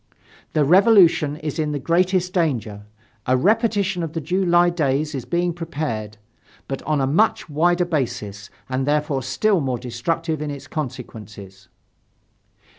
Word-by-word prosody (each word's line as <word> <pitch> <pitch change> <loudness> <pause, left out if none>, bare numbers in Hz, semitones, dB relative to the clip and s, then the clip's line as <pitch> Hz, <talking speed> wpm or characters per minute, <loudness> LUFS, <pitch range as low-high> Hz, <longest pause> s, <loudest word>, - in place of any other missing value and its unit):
"The 150 -2 +3
Revolution 175 -4 +5
is 155 0 -5
in 150 -1 -1
the - - -1
greatest 180 +5 +1
danger. 115 - -1 0.4
A 130 +1 +3
repetition 200 - +1
of 160 -2 -4
the 165 - -2
July 175 +2 +2
days 150 -2 0
is 130 -4 -4
being 175 0 0
prepared 145 -11 -4 0.5
but 135 - -4
on 155 -2 +1
a 135 - +2
much 170 +12 +2
wider 175 +4 +2
basis 120 - -3 0.2
and 130 +1 -2
therefore 150 -2 0
still 180 - +1
more 130 -3 -1
destructive 150 +7 -3
in 150 - -3
its 140 -1 -7
consequences." 110 - -8
150 Hz, 140 wpm, -22 LUFS, 130-175 Hz, 0.5 s, Revolution